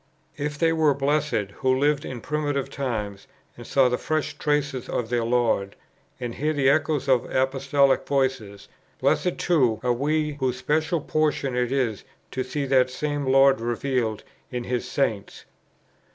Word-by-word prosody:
If 150 -1 -3
they 165 +2 +2
were 155 -3 +3
blessed 140 -7 0
who 130 -1 +2
lived 145 +1 +1
in 125 -3 -6
primitive 145 -1 -2
times, 105 -7 -4 0.3
and 120 - -11
saw 135 -2 +4
the 125 0 -1
fresh 155 -1 -2
traces 145 -4 -1
of 115 -2 -2
their 120 -1 0
Lord, 115 -4 +1 0.4
and 120 -2 -4
heard 150 +4 -1
the 135 -1 +4
echoes 150 -1 0
of 130 -3 +2
Apostolic 135 +1 +2
voices, 130 -8 -1 0.3
blessed 180 - +1
too 130 -11 +2
are 125 -1 +2
we 150 +3 -1
whose 130 -2 0
special 155 +4 0
portion 150 -4 0
it 125 0 0
is 125 -7 -1 0.3
to 130 - -2
see 140 +3 -3
that 130 -1 +3
same 145 +1 -3
Lord 135 -1 +5
revealed 120 -2 -1 0.3
in 125 -1 -4
His 125 0 -3
Saints. 110 -9 -2
135 Hz, 155 wpm, -24 LUFS, 125-145 Hz, 0.4 s, Lord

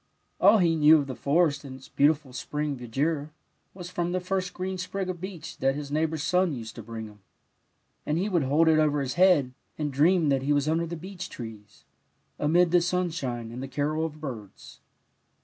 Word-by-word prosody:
All 210 +3 +7
he 170 -4 +3
knew 155 0 +7
of 145 - -1
the 135 - -5
forest 150 +1 +1
and 135 -2 -8
its 130 - -13
beautiful 145 -2 +1
spring 150 +2 -3
verdure 140 +5 -2 0.5
was 180 -1 -8
from 175 -1 -2
the 185 - +1
first 185 0 -2
green 185 +1 -4
sprig 185 +1 -3
of 175 -2 -10
beech 175 -4 -7
that 135 0 +1
his 145 -1 -6
neighbour's 155 0 0
son 180 -1 +2
used 115 -4 -7
to - - -6
bring 110 0 -7
him, 105 -1 -14 0.8
and 150 - -1
he 190 +4 0
would 180 -5 +1
hold 145 +5 +3
it 160 -1 +5
over 150 -1 +2
his 130 -2 -2
head, 175 -9 +4 0.2
and 150 -2 -2
dream 160 +3 +3
that 135 -1 +2
he 145 +2 +1
was 145 0 +1
under 165 +2 +1
the 170 - -5
beech 180 +2 -8
trees, 110 -4 -10 0.5
amid 170 +3 +3
the 175 -1 +5
sim 180 0 0
shine 120 -7 -4
and 125 +2 -7
the 135 - -5
carol 150 +4 -1
of 155 -1 -5
birds. 120 -10 -9
155 Hz, 205 wpm, -27 LUFS, 135-175 Hz, 0.8 s, All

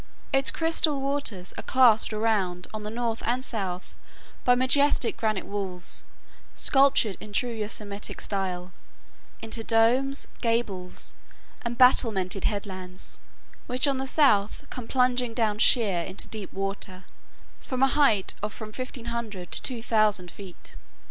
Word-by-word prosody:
Its 270 0 +3
crystal 325 -3 +1
waters 270 -9 -2
are - - -3
clasped 245 -5 +4
around 210 -5 0
on 215 - -5
the 210 - -5
north 230 0 -2
and 250 +3 0
south 190 -6 -3 0.5
by 245 - +5
majestic 260 0 +3
granite 215 -3 -1
walls 190 -3 -4 0.5
sculptured 270 -7 +3
in 215 - -10
true 240 +3 0
Yosemitic 210 -2 -3
style 185 -2 -3 0.7
into 225 0 -3
domes, 245 +5 +2 0.2
gables, 215 -6 -2 0.5
and 235 0 -4
battlemented 210 -7 +3
headlands, 185 -3 -4 0.5
which 255 +3 +3
on 275 -1 +1
the 265 +1 -3
south 220 -9 +2
come 250 -3 -6
plunging 250 -2 +1
down 215 -3 0
sheer 210 -8 +4
into 190 +3 -5
deep 210 -4 -6
water, 195 -1 -4 0.6
from 255 0 -2
a - - +7
height 260 -9 +3
of 210 +1 -3
from 215 0 -8
1500 235 -5 -5
to - - +2
2000 215 -7 +1
feet. 190 -2 -12
220 Hz, 130 wpm, -26 LUFS, 195-250 Hz, 0.7 s, a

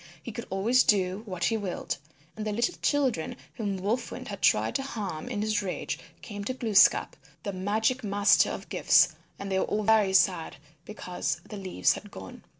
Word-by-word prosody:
He 235 - -6
could 235 +3 -7
always 225 +7 +3
do 190 -2 +2
what 180 -3 -4
he 225 - +2
willed. 195 -4 -4 0.4
And 215 - -5
the - - -1
little 235 +11 0
children 265 - 0 0.2
whom 205 -4 -3
Wolf 215 +6 -1
Wind - - -7
had - - -7
tried - - +3
to - - -4
harm 215 -8 -5
in 210 -4 -2
his 215 -1 0
rage 190 -3 -4 0.2
came 205 -2 -6
to 255 - -2
Glooskap, 220 -5 +4 0.3
the 200 - -3
Magic 220 +7 0
Master 205 0 +4
of - - -7
gifts, - - +5 0.3
and 200 0 -6
they 190 - +2
were - - +1
all 215 0 -1
very 210 -2 +4
sad 180 -3 +2 0.3
because 180 -4 -4
the 215 - -8
leaves 185 - +1
had - - -9
gone. - - -10
205 Hz, 190 wpm, -28 LUFS, 190-225 Hz, 0.4 s, gifts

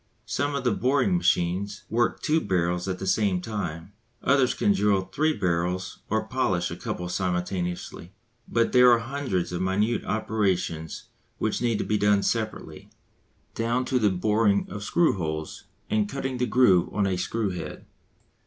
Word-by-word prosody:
Some 145 +1 -1
of 140 - -2
the 125 - +2
boring 140 - +2
machines 100 - 0
work 120 +2 0
two 160 +1 +2
barrels 90 - 0
at 95 -1 -2
the 95 - -5
same 95 -1 +2
time, 90 -3 -5 0.3
others 135 -2 +3
can 100 - +2
drill 100 -1 +2
three 130 +13 0
barrels 90 - -1
or - - 0
polish - - 0
a - - -4
couple 90 - -4
simultaneously. 90 -1 -3 0.4
But 115 0 +1
there 125 -1 +7
are 120 - +6
hundreds 115 -7 -2
of 90 0 -3
minute 105 +5 +1
operations 90 -7 -1 0.3
which - - -1
need 120 -3 +1
to - - -2
be 105 -1 0
done 105 -1 +3
separately, 110 -2 -3 0.6
down 120 +3 0
to 130 0 +1
the 105 -3 +3
boring 105 +2 +2
of 105 - -6
screw 165 - +2
holes 80 -2 -4 0.2
and 105 -1 0
cutting 135 -1 -3
the 125 - +1
groove 105 -8 +4
on 105 -1 0
a 95 -1 0
screw 105 +3 -1
head. 90 - -7
105 Hz, 165 wpm, -26 LUFS, 90-120 Hz, 0.6 s, there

